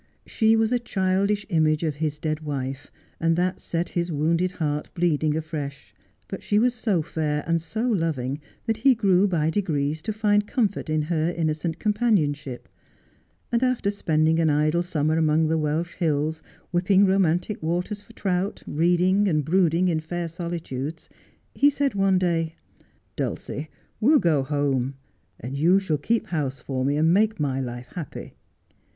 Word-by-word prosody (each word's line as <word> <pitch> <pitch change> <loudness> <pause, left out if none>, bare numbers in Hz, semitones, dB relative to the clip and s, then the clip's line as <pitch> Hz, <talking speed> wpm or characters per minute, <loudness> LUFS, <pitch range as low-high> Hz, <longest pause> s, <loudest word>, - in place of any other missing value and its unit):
She 220 0 +3
was 225 0 +2
a 245 - +2
chddish 200 -1 0
image 155 -3 +2
of 155 -2 0
his 150 -1 -2
dead 155 0 -2
wife, 135 -3 -5 0.3
and 165 0 +2
that 180 +2 -1
set 170 +1 -2
his 175 0 -2
wounded 165 +5 +1
heart 150 -3 -2
bleeding 155 -3 +1
afresh; 150 -3 -6 0.3
but - - -6
she 205 - 0
was 240 +3 +3
so 215 -8 0
fair 150 -1 -2
and 165 0 +1
so 220 +9 -3
loving 155 - -1 0.2
that 225 -2 0
he 260 +3 +4
grew 200 -3 +3
by 160 -4 +1
degrees 155 -5 -1
to 220 - -3
find 210 -1 +2
comfort 210 - -1
in 155 0 +1
her 160 +1 0
innocent 160 -1 -2
companionship, 175 - 0 0.8
and 235 0 +2
after 255 -6 +1
spending 160 -4 +1
an 160 -1 +3
idle 155 +3 +2
summer 160 -2 0
among 155 0 +2
the 160 - +2
Welsh 155 +3 -1
hills, 155 -1 -1 0.3
whipping 185 +3 +4
romantic 190 +1 +1
waters 175 +6 -2
for 230 - -18
trout, 195 -1 -2
reading 180 +5 +2
and 155 -5 +1
brooding 175 +1 +3
in 165 -3 +1
fair 170 +2 -4
solitudes, 165 -3 -5 0.4
he 285 - +5
said 280 -3 0
one 195 -1 +3
day^— 165 -3 0 0.3
' - - -39
Dulcie, 150 +3 -4 0.3
we'll 280 +8 +5
go 165 - +2
home, 135 -2 -1 0.4
and 130 +4 -6
you 170 +7 +4
shall 160 -7 -1
keep 230 +10 0
house 140 -6 -2
for 130 0 -3
me, 140 +2 +1
and 160 +2 +4
make 215 +1 +2
my 135 -3 0
life 120 -1 -6
happy.' 165 -6 -7
165 Hz, 165 wpm, -24 LUFS, 150-195 Hz, 0.8 s, he